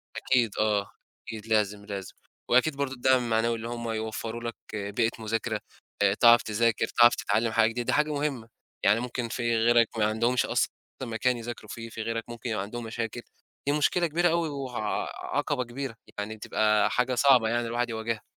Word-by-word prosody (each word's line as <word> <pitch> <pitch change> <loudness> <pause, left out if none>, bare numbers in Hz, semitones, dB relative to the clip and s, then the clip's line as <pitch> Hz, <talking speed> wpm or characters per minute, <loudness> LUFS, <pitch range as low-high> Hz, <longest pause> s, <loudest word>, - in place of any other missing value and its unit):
أكيد 120 -5 +1
آه، 105 -2 +1 0.4
أكيد 110 -2 -7
لازم، 105 -2 +1
لازم، 100 -2 -6 0.3
وأكيد 130 +5 +4
برضو 140 -2 -1
الدعم 130 0 +3
المعنوي 115 0 +1
اللي 115 0 -6
هُم 120 0 -5
هيوفّروا 110 +1 -4
لك 115 -1 -4 0.2
بيئة 105 +2 0
مذاكرة، 110 0 -2 0.4
آآ 100 -1 +4
تعرف 120 +2 +6
تذاكر 110 +1 +1
تعرف 120 0 +5
تتعلّم 110 +3 0
حاجة 110 0 +4
جديدة 120 +1 -4
دي - - +1
حاجة 150 +1 +2
مُهمة، 140 -6 -2 0.4
يعني 105 +3 +4
ممكن 120 -1 -3
في 120 0 0
غيرك 115 0 +3
ما 105 - +3
عندهمش 115 +3 +1
أصلًا - - 0 0.3
مكان 120 +1 0
يذاكروا 115 -2 -7
فيه، 115 -1 -7
في 115 - -6
غيرك 115 0 -2
ممكن 120 0 -6
يبقى 105 -3 -1
عندهم 120 +4 -6
مشاكل، 115 +1 -4 0.5
دي 145 - +3
مشكلة 170 +4 +2
كبيرة 175 +3 +2
أوي 165 -1 +1
وه 135 -4 -5 0.5
عقبة 125 - -1
كبيرة، 125 0 -6 0.2
يعني 105 +2 -4
بتبقى 105 0 +2
حاجة 125 +1 +1
صعبة 125 -4 +5
يعني 120 0 0
الواحد 120 +1 -1
يواجهها. 110 0 -3
115 Hz, 180 wpm, -27 LUFS, 110-125 Hz, 0.5 s, تعرف